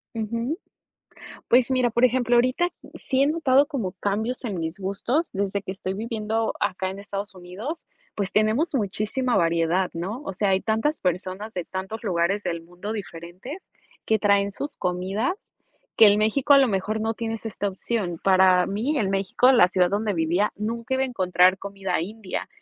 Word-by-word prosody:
Ujú. 230 Hz, +7 st, -2 dB, 0.9 s
Pues 245 Hz, +1 st, +4 dB
mira, 255 Hz, -2 st, +2 dB
por 235 Hz, +2 st, +2 dB
ejemplo, 245 Hz, -1 st, +3 dB
ahorita, 255 Hz, +9 st, +2 dB, 0.3 s
sí 265 Hz, 0 st, 0 dB
he -, -, +4 dB
notado 290 Hz, -3 st, +3 dB
como 250 Hz, -, -3 dB
cambios 215 Hz, +7 st, -2 dB
en 205 Hz, -6 st, -3 dB
mis 160 Hz, +2 st, -4 dB
gustos, 200 Hz, -, -1 dB
desde 200 Hz, 0 st, -1 dB
que 190 Hz, -, -5 dB
estoy 190 Hz, 0 st, -4 dB
viviendo 220 Hz, +1 st, -2 dB
acá 190 Hz, -2 st, -1 dB
en 190 Hz, -, -8 dB
Estados 200 Hz, 0 st, -6 dB
Unidos, 190 Hz, -, -7 dB, 0.3 s
pues 195 Hz, -3 st, -3 dB
tenemos 220 Hz, +10 st, +2 dB
muchísima 230 Hz, +3 st, 0 dB
variedad, 170 Hz, +2 st, +2 dB
¿no? 195 Hz, +10 st, -4 dB
O 290 Hz, -, -5 dB
sea, 200 Hz, +1 st, +1 dB
hay 190 Hz, 0 st, +3 dB
tantas 225 Hz, +10 st, 0 dB
personas, 185 Hz, +4 st, -2 dB
de 180 Hz, -, -3 dB
tantos 190 Hz, +5 st, -6 dB
lugares 190 Hz, +1 st, +1 dB
del 170 Hz, -3 st, -3 dB
mundo, 180 Hz, +5 st, -7 dB
diferentes, 190 Hz, -, -8 dB, 0.4 s
que 220 Hz, -, +3 dB
traen 200 Hz, -1 st, +2 dB
sus 285 Hz, +8 st, -6 dB
comidas, 190 Hz, -, -1 dB, 0.6 s
que 225 Hz, -, +8 dB
el 205 Hz, 0 st, +6 dB
México, 235 Hz, +7 st, +3 dB
a -, -, +8 dB
lo 270 Hz, -2 st, +4 dB
mejor, 210 Hz, +2 st, -1 dB
no 225 Hz, +1 st, -1 dB
tienes 225 Hz, 0 st, -4 dB
esta 205 Hz, -2 st, -2 dB
opción. 190 Hz, -2 st, -3 dB
Para 185 Hz, -1 st, +5 dB
mí, 245 Hz, +10 st, -1 dB
en 195 Hz, -4 st, 0 dB
México, 195 Hz, +6 st, +3 dB
la 235 Hz, -8 st, +6 dB
ciudad 180 Hz, -1 st, +2 dB
donde 205 Hz, +1 st, 0 dB
vivía, 170 Hz, +5 st, +1 dB
nunca 230 Hz, +4 st, -3 dB
iba 260 Hz, -, +1 dB
a -, -, +1 dB
encontrar 185 Hz, -5 st, +3 dB
comida 195 Hz, -3 st, -3 dB
india, 200 Hz, +2 st, -5 dB
205 Hz, 175 wpm, -24 LUFS, 185-235 Hz, 0.9 s, que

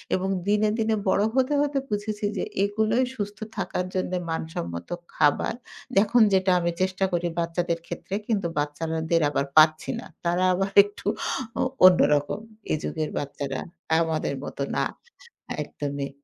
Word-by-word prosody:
এবং 190 Hz, +1 st, -1 dB, 0.2 s
দিনে, 210 Hz, +1 st, +3 dB
দিনে 220 Hz, 0 st, +1 dB
বড় 200 Hz, -, +3 dB
হতে, 265 Hz, +2 st, +2 dB
হতে 290 Hz, -1 st, 0 dB
বুঝেছি 210 Hz, 0 st, -2 dB
যে, -, -, -1 dB, 0.2 s
এগুলোই 220 Hz, +4 st, +2 dB
সুস্থ 205 Hz, -2 st, -4 dB, 0.2 s
থাকার 180 Hz, -, -2 dB
জন্য 185 Hz, -1 st, -1 dB, 0.2 s
মানসম্মত 85 Hz, -, -4 dB, 0.3 s
খাবার। 145 Hz, +7 st, +2 dB, 0.4 s
দেখুন 215 Hz, +4 st, +5 dB
যেটা 190 Hz, 0 st, +3 dB
আমি 170 Hz, 0 st, 0 dB
চেষ্টা 190 Hz, +1 st, +1 dB
করি 175 Hz, 0 st, 0 dB
বাচ্চাদের 170 Hz, 0 st, -1 dB
ক্ষেত্রে। 195 Hz, -, -5 dB
কিন্তু 200 Hz, -6 st, 0 dB
বাচ্চারা 155 Hz, +2 st, -1 dB
দের 165 Hz, -1 st, +4 dB
আবার 140 Hz, -, 0 dB
পারছি 155 Hz, 0 st, +6 dB
না -, -, -9 dB, 0.2 s
তারা 175 Hz, +2 st, +2 dB
আবার 195 Hz, +2 st, 0 dB
একটু 205 Hz, 0 st, -12 dB, 0.5 s
অ -, -, +3 dB, 0.2 s
অন্যরকম। 150 Hz, -3 st, +5 dB, 0.3 s
এ -, -, +3 dB
যুগের 155 Hz, -2 st, -2 dB
বাচ্চারা 140 Hz, -1 st, -3 dB, 0.4 s
আমাদের 160 Hz, -3 st, -1 dB
মতো -, -, -6 dB
না -, -, +2 dB, 0.8 s
একদমই। 140 Hz, -1 st, -4 dB
180 Hz, 145 wpm, -25 LUFS, 155-205 Hz, 0.8 s, পারছি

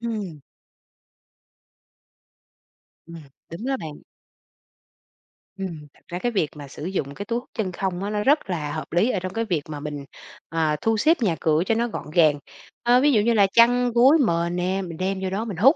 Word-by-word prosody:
Ừm. 210 Hz, -10 st, -4 dB, 2.7 s
Ừm. 170 Hz, 0 st, -9 dB, 0.3 s
Đúng 205 Hz, +9 st, -6 dB
đó 270 Hz, 0 st, 0 dB
bạn. 150 Hz, -2 st, -8 dB, 1.6 s
Ừm. 170 Hz, -6 st, -6 dB
Thật -, -, -24 dB
ra 175 Hz, 0 st, -5 dB
cái 240 Hz, +4 st, -1 dB
việc 175 Hz, -8 st, 0 dB
mà 145 Hz, -1 st, -9 dB
sử 145 Hz, +3 st, -8 dB
dụng 145 Hz, -7 st, -3 dB
cái 205 Hz, -, -6 dB
túi 235 Hz, +2 st, -1 dB
hút -, -, -18 dB
chân 205 Hz, -5 st, -2 dB
không 190 Hz, 0 st, -3 dB
á, 205 Hz, -, -2 dB
nó 210 Hz, 0 st, -1 dB
rất 285 Hz, -7 st, +2 dB
là 150 Hz, -5 st, -2 dB
hợp 155 Hz, +1 st, -6 dB
lý 180 Hz, +9 st, +2 dB
ở 200 Hz, -, 0 dB
trong 185 Hz, +1 st, -5 dB
cái 225 Hz, 0 st, -1 dB
việc 170 Hz, -8 st, 0 dB
mà 150 Hz, -1 st, -5 dB
mình, 145 Hz, -1 st, -6 dB, 0.4 s
ờ, 160 Hz, -2 st, +1 dB
thu 225 Hz, -1 st, +1 dB
xếp 320 Hz, +9 st, +4 dB
nhà 180 Hz, -7 st, +2 dB
cửa 160 Hz, +1 st, +2 dB
cho 225 Hz, -, +1 dB
nó 235 Hz, +1 st, +1 dB
gọn -, -, -6 dB
gàng. 155 Hz, -4 st, +4 dB, 0.4 s
Ơ, 245 Hz, +1 st, +5 dB
ví 290 Hz, 0 st, +4 dB
dụ 215 Hz, -5 st, +4 dB
như 235 Hz, +2 st, +2 dB
là 200 Hz, -3 st, +5 dB
chăn, 245 Hz, +1 st, +5 dB
gối, 260 Hz, +7 st, +6 dB
mền 170 Hz, +1 st, 0 dB
nè, 185 Hz, +2 st, -1 dB
mình 170 Hz, -3 st, -7 dB
đem 190 Hz, +1 st, -1 dB
vô 190 Hz, -, -1 dB
đó 205 Hz, +4 st, -2 dB
mình 200 Hz, -7 st, -5 dB
hút, 265 Hz, -, +6 dB
190 Hz, 205 wpm, -24 LUFS, 165-230 Hz, 2.7 s, gối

